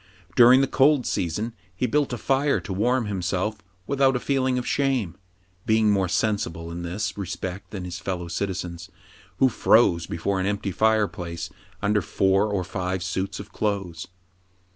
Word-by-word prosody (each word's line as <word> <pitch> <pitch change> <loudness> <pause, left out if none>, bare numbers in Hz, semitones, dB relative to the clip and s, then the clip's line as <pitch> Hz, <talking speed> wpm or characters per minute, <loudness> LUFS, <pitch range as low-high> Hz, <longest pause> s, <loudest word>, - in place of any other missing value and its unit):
During 125 +2 +8
the 135 - +2
cold 140 -1 +3
season 105 +7 -2 0.2
he 125 - 0
built 145 +3 +1
a 120 - -2
fire 140 +4 +1
to 95 - -5
warm 120 +5 +1
himself 95 +1 -2 0.3
without 135 0 +2
a - - +1
feeling 130 -1 0
of 125 - -2
shame, 130 -11 0 0.5
being 110 -1 +4
more 95 -2 +2
sensible 85 -4 -1
in 85 +1 -5
this 95 +4 -3
re 100 - -3
spect 95 +2 -5
than 95 -4 -6
his 90 0 -6
fellow 90 -3 -4
citizens, 85 -1 -4 0.5
who 135 - +5
froze 100 -9 +3
before 95 +4 -1
an 95 - 0
empty 100 -1 -2
fireplace 95 -6 0 0.3
under 105 0 +2
four 95 +3 +2
or 95 -3 0
five 90 0 -3
suits 95 +1 -3
of 100 +1 -9
clothes. 95 -6 -2
100 Hz, 165 wpm, -25 LUFS, 90-120 Hz, 0.5 s, During